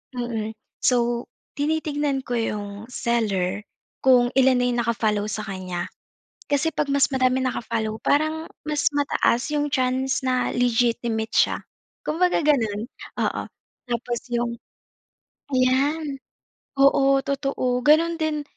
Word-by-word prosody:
Mm, 225 Hz, -3 st, -3 dB, 0.3 s
so, 240 Hz, -1 st, +2 dB, 0.3 s
tinitignan 290 Hz, -3 st, 0 dB
ko 245 Hz, -, -3 dB
'yung 210 Hz, -2 st, -2 dB, 0.2 s
seller, 210 Hz, -6 st, 0 dB, 0.4 s
kung 245 Hz, -2 st, +5 dB
ilan 265 Hz, 0 st, +5 dB
na -, -, +2 dB
'yung 240 Hz, -1 st, 0 dB
naka-follow 215 Hz, -2 st, 0 dB
sa 215 Hz, +2 st, -3 dB
kanya. 185 Hz, -2 st, -4 dB, 0.7 s
Kasi 285 Hz, +3 st, +2 dB
'pag 285 Hz, -2 st, -1 dB
mas 280 Hz, -1 st, +4 dB
madaming 260 Hz, -1 st, +2 dB
naka-follow, 225 Hz, -2 st, -2 dB
parang 310 Hz, +2 st, +1 dB, 0.2 s
mas 300 Hz, -1 st, -1 dB
mataas 280 Hz, -3 st, +1 dB
'yung 295 Hz, 0 st, +1 dB
chance 260 Hz, 0 st, 0 dB
na 255 Hz, -1 st, +1 dB
legitimate 235 Hz, -2 st, +1 dB
siya, -, -, +3 dB, 0.5 s
kumbaga, 355 Hz, +4 st, +2 dB
gano'n. 225 Hz, -7 st, +1 dB, 0.4 s
Oo, -, -, -1 dB, 0.5 s
tapos 240 Hz, 0 st, -2 dB
'yung 240 Hz, 0 st, 0 dB, 1.0 s
ayan, 275 Hz, +3 st, +1 dB, 0.6 s
oo, 275 Hz, 0 st, +5 dB
totoo, 275 Hz, -3 st, -1 dB
gano'n 330 Hz, +3 st, +5 dB
din 305 Hz, -1 st, 0 dB
255 Hz, 115 wpm, -24 LUFS, 235-285 Hz, 1.0 s, kung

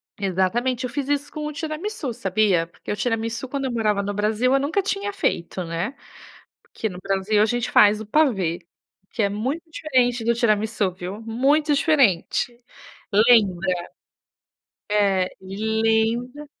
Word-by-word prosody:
Exatamente. 205 Hz, +7 st, 0 dB
Eu -, -, -3 dB
fiz 275 Hz, +2 st, -3 dB
isso 290 Hz, 0 st, -1 dB
com 305 Hz, -1 st, -5 dB
o -, -, -4 dB
tiramisú, 315 Hz, -, -4 dB
sabia, 195 Hz, -5 st, +1 dB
porque 170 Hz, -, -9 dB
o -, -, -1 dB
tiramisú, 230 Hz, +2 st, -2 dB
quando 275 Hz, +1 st, -3 dB
eu 260 Hz, -, -2 dB
morava 215 Hz, -3 st, +1 dB
no 200 Hz, +1 st, -3 dB
Brasil, 215 Hz, +5 st, +1 dB
eu 275 Hz, -, +4 dB
nunca 300 Hz, +8 st, 0 dB
tinha 400 Hz, +1 st, -2 dB
feito, 185 Hz, -, -2 dB
né, 170 Hz, +8 st, -3 dB, 0.7 s
porque 220 Hz, -, -5 dB
no 180 Hz, -3 st, -9 dB
Brasil 195 Hz, +2 st, +1 dB
a -, -, +6 dB
gente 240 Hz, +1 st, -1 dB
faz 210 Hz, +1 st, +5 dB
o 220 Hz, -, -7 dB
pavê, 205 Hz, -, +1 dB, 0.5 s
que 225 Hz, -, -2 dB
é 200 Hz, -, +3 dB
muito 255 Hz, +11 st, -3 dB
diferente 250 Hz, -7 st, +1 dB
do 235 Hz, +1 st, +2 dB
tiramisú, 215 Hz, -4 st, +1 dB
viu, 185 Hz, +3 st, -7 dB
muito 275 Hz, +7 st, +2 dB
diferente 245 Hz, -, +2 dB, 0.5 s
Lembra. 195 Hz, -5 st, +3 dB, 1.1 s
É, 195 Hz, -3 st, +2 dB
lembra, 220 Hz, +6 st, 0 dB
225 Hz, 150 wpm, -23 LUFS, 200-265 Hz, 1.1 s, a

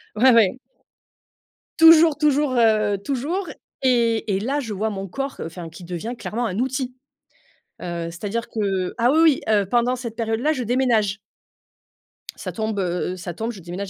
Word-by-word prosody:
ouais, 255 Hz, +4 st, +5 dB
ouais. 230 Hz, +2 st, +4 dB, 1.2 s
Toujours, 325 Hz, -1 st, +7 dB
toujours, 295 Hz, -3 st, +2 dB
heu, 215 Hz, -4 st, +3 dB
toujours 285 Hz, -, -3 dB, 0.3 s
et 230 Hz, -5 st, +2 dB
et -, -, -2 dB
là, 275 Hz, +6 st, -1 dB
je 225 Hz, -6 st, -5 dB
vois 215 Hz, +3 st, -1 dB
mon 195 Hz, -1 st, -5 dB
corps, 275 Hz, +8 st, -5 dB
enfin, 165 Hz, 0 st, -7 dB
qui 175 Hz, +2 st, -12 dB
devient 180 Hz, +8 st, -5 dB
clairement 235 Hz, +1 st, -3 dB
un 190 Hz, 0 st, -3 dB
outil. 255 Hz, 0 st, -2 dB, 0.9 s
Heu, 170 Hz, -1 st, -4 dB
c'est-à-dire 210 Hz, +7 st, -4 dB
que 195 Hz, -4 st, -2 dB
ah 240 Hz, +2 st, +3 dB
oui, 315 Hz, -, +3 dB
oui, 315 Hz, -4 st, +4 dB
oui, 220 Hz, -, +1 dB
heu, 200 Hz, -2 st, +2 dB
pendant 240 Hz, +4 st, +1 dB
cette 235 Hz, -3 st, -7 dB
période-là, 230 Hz, +6 st, 0 dB
je 255 Hz, -5 st, -3 dB
déménage. 225 Hz, -5 st, +1 dB, 1.2 s
Ça -, -, -6 dB
tombe, 220 Hz, -2 st, -3 dB
heu, 180 Hz, 0 st, -2 dB
ça 175 Hz, -1 st, -7 dB
tombe 225 Hz, +5 st, -3 dB
je 195 Hz, -, -11 dB
déménage, 180 Hz, +4 st, -6 dB
225 Hz, 170 wpm, -22 LUFS, 195-255 Hz, 1.2 s, Toujours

